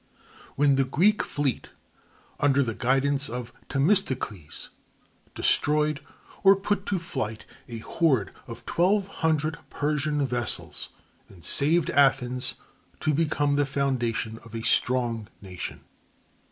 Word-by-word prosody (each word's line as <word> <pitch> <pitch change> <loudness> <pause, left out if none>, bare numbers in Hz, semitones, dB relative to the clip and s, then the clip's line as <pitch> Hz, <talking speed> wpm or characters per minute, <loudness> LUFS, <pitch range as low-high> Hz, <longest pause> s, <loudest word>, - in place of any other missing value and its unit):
when 140 -1 +3
the 135 - +4
Greek 180 +11 +2
fleet, 140 -4 -3 0.7
under 140 -1 +3
the 115 -3 -2
guidance 135 +4 +1
of 120 0 -6 0.2
Themistocles, 135 - 0 0.7
destroyed 150 +1 +2 0.4
or 195 0 +7
put 195 0 -2
to 200 - 0
flight 110 -10 -4 0.2
a 115 - -5
horde 130 - 0
of 115 0 -9
twelve 190 +3 +2 0.2
hundred 155 -2 +1
Persian 150 0 0
vessels, 120 -2 -1 0.4
and 90 -4 -14
saved 160 +3 +3
Athens, 130 -2 +2 0.4
to 155 - +1
become 145 -2 +1
the 145 - +3
foundation 120 -5 -1
of 115 -1 -11
a 115 - -4
strong 120 -4 +1
nation. 95 -3 -7
140 Hz, 115 wpm, -26 LUFS, 120-155 Hz, 0.7 s, or